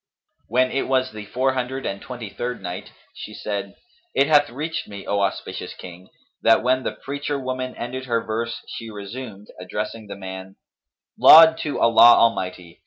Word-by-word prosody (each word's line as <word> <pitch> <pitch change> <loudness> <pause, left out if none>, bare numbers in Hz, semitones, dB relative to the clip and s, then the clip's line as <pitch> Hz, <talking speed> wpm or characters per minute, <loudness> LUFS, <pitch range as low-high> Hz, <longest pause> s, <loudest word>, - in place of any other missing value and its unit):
When 130 +3 +2
it 135 - -1
was 130 -1 +1
the 105 -1 -9
Four 130 +4 0
Hundred 130 +1 -3
and 100 0 -4
Twenty 120 -5 -8
third 125 +2 -4
Night, 90 -1 -7 0.2
She - - -9
said, 100 -1 -5 0.4
It 140 - +4
hath 145 -1 +4
reached 150 +6 -4
me, 100 -2 -9
O 100 - 0
auspicious 100 -1 -3
King, 90 +1 -12 0.3
that 115 0 +4
when 130 +1 +2
the - - -3
preacher 145 +1 -4
woman 130 -1 -4
ended 130 +2 -5
her 115 -2 0
verse 115 +2 -4
she 115 -1 -7
resumed, 105 0 -9
addressing 105 +4 -5
the 100 - -7
man, 95 0 -8 0.3
" - - -37
'Laud 160 0 +9
to 150 - -3
Allah 115 +1 +7
Almighty! 90 -6 0
115 Hz, 175 wpm, -22 LUFS, 100-130 Hz, 0.4 s, Laud